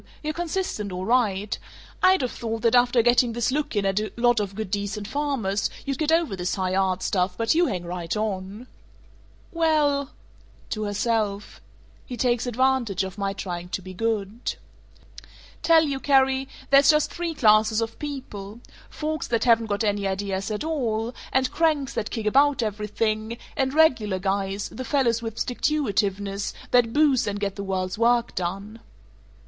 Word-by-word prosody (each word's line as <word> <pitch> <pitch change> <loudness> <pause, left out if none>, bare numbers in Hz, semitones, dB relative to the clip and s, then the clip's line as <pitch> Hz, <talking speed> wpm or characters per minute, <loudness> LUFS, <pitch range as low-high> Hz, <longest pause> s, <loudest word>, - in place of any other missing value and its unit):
You're 305 0 -2
consistent, 340 - -3
all 180 +1 -4
right. 210 -4 +1 0.5
I'd 370 -5 +5
of 250 - -1
thought 225 -1 -4
that 230 0 +3
after 245 -1 +4
getting 240 0 +4
this 240 +2 0
look 290 -3 -2
in 205 -1 +1
at 195 +1 +1
a 215 - -3
lot 240 -1 +3
of 200 -2 -3
good 215 -3 -5
decent 205 +1 -3
farmers, 260 -9 -1 0.2
you'd 275 -1 -3
get 310 0 +1
over 325 -10 +2
this 180 -1 -2
high 185 -2 -1
art 190 -1 +1
stuff, 180 -1 0
but 225 0 +2
you 340 +2 +3
hang 180 -3 -3
right 170 +1 -3
on." 205 +1 -3 0.9
"Well 300 -4 +2 0.3
" - - -28
To 215 -1 -2
herself: 210 -1 -1 0.4
"He 250 - -7
takes 240 0 +1
advantage 245 -5 +1
of 190 +1 -7
my 195 0 -1
trying 180 -3 -5
to 190 - -3
be 185 0 -9
good." 220 +2 -2 1.1
"Tell 325 -1 +5
you, 280 -3 -2
Carrie: 270 -1 +3 0.2
There's 275 0 +7
just 305 -1 +4
three 340 -2 -3
classes 215 -2 +4
of 225 0 -4
people: 235 -8 -7 0.3
folks 310 -1 -3
that 230 -1 0
haven't 230 -2 +4
got 205 +1 -1
any 205 -2 0
ideas 195 0 -2
at 215 +4 -3
all; 240 -7 -1 0.2
and 260 -1 +1
cranks 305 -5 +1
that 225 -2 -2
kick 225 -3 -4
about 275 +3 +3
everything; 215 +1 -2 0.2
and 265 -2 0
Regular 250 -11 +3
Guys, 195 +1 -2
the 260 - -7
fellows 245 -4 +1
with 225 -2 -5
sticktuitiveness, 205 -8 -1 0.2
that 245 -2 +4
boost 285 -4 +3
and 205 0 -2
get 200 -1 -2
the 200 - -5
world's 185 0 -2
work 235 0 +2
done." 195 +5 -4
225 Hz, 170 wpm, -25 LUFS, 200-265 Hz, 1.1 s, There's